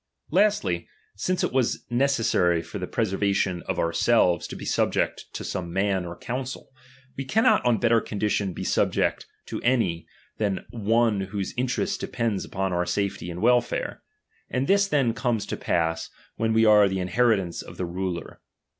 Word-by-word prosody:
18. 200 +4 +6
L^tly, 90 - -3 0.3
since 180 - -1
it - - -1
was 130 -3 0
necessary 115 -10 +2
for 85 +5 -7
the 90 - -4
pre 115 - 0
servation 95 -2 0
of - - -1
ourselves 85 +2 +2
to - - -7
be - - -8
subject - - 0
to - - -6
some 85 -2 -4
ma7t 95 -1 0
or 85 - -7
council, 130 +2 -5 0.4
we 135 - -3
cannot 215 +8 +3
on 120 -2 +3
better 115 +1 +3
condition 105 -2 -1
be - - -6
sub - - +2
ject - - 0 0.2
to - - -5
any, 115 -10 +1 0.3
than 100 -3 -1
one 115 -1 +2
whose 95 0 -4
interest 130 +11 -1
depends 115 -5 -2
upon 95 0 -2
J^. 90 - 0
our 90 - +1
safety 100 -3 -2
and 90 +3 -5
welfare; 120 0 +1 0.5
and 130 +1 0
this 200 +4 +3
then 135 -9 +2
comes 115 -3 -1
to - - -3
pass, 80 -1 -1 0.3
when 115 0 0
we 110 0 +4
are 105 -2 +6
the 95 0 -2
inheritance 95 -2 +1
of - - -11
the 90 - -2
ruler. 90 0 -4
105 Hz, 175 wpm, -25 LUFS, 90-120 Hz, 0.5 s, 18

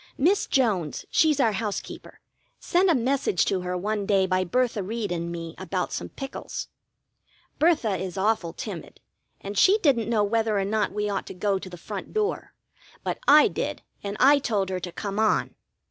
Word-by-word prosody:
Miss 360 +9 +2
Jones, 200 - 0
she's 305 -3 +3
our 235 -5 +4
housekeeper, 210 0 -5 0.4
sent 365 +2 +2
a 335 - +4
message 255 -6 +1
to 190 -2 0
her 180 0 -3
one 205 +2 -2
day 195 -2 +3
by 185 0 +1
Bertha 240 +3 0
Reed 210 +1 -3
and 170 0 -3
me 165 -1 -6
about - - -3
some - - -4
pickles. 270 -1 -6 0.9
Bertha 290 - +3
is 185 0 -5
awful 190 -4 +1
timid, - - -8 0.4
and 200 +1 -6
she 385 - +5
didn't 270 - +2
know 220 -3 +2
whether 220 0 +1
or 195 - +1
not 210 +1 0
we 210 0 -2
ought 200 -2 -3
to - - -8
go 195 +1 0
to 185 - -9
the 175 - -9
front 195 +3 -7
door; 430 0 -2 0.5
but - - -2
I 300 +1 +8
did, - - -4 0.2
and 200 +1 -4
I 285 +2 +6
told 205 -7 -1
her 185 -1 -2
to 175 0 -6
come 200 +3 -4
on. 220 -1 +2
210 Hz, 185 wpm, -25 LUFS, 190-255 Hz, 0.9 s, I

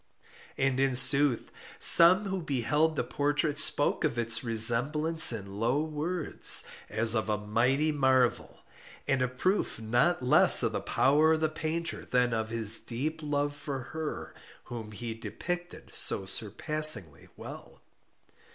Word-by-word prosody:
And 135 -1 -2
in 135 -1 -1
sooth 135 0 +2 0.3
some 180 +5 +6
who 190 -1 -5
beheld 150 +2 -2
the - - -3
portrait 145 +1 -3
spoke 145 -1 -1
of 120 - -3
its 115 0 -2
resemblance 125 +9 +3
in 100 -3 -8
low 125 +7 -1
words, 160 +2 -2 0.2
as 110 0 +2
of 110 -1 -3
a 105 - -2
mighty 125 +9 -2
marvel, 130 -4 -2 0.5
and 135 -1 -1
a 125 - 0
proof 135 - -3
not 120 +8 -1
less 125 - +8
of - - -1
the - - -4
power 150 +4 0
of 160 - -3
the 155 - -1
painter 160 +2 -6
than 125 -1 -2
of 110 -1 -4
his 115 -1 0
deep 155 +7 -7
love 145 -1 -4
for 140 -2 -7
her 160 -1 -7 0.3
whom 115 -3 -10
he 115 +2 -8
depicted 175 +9 -9
so 95 - +4
surpassingly 110 - -1
well. - - -13
135 Hz, 140 wpm, -27 LUFS, 115-155 Hz, 0.5 s, less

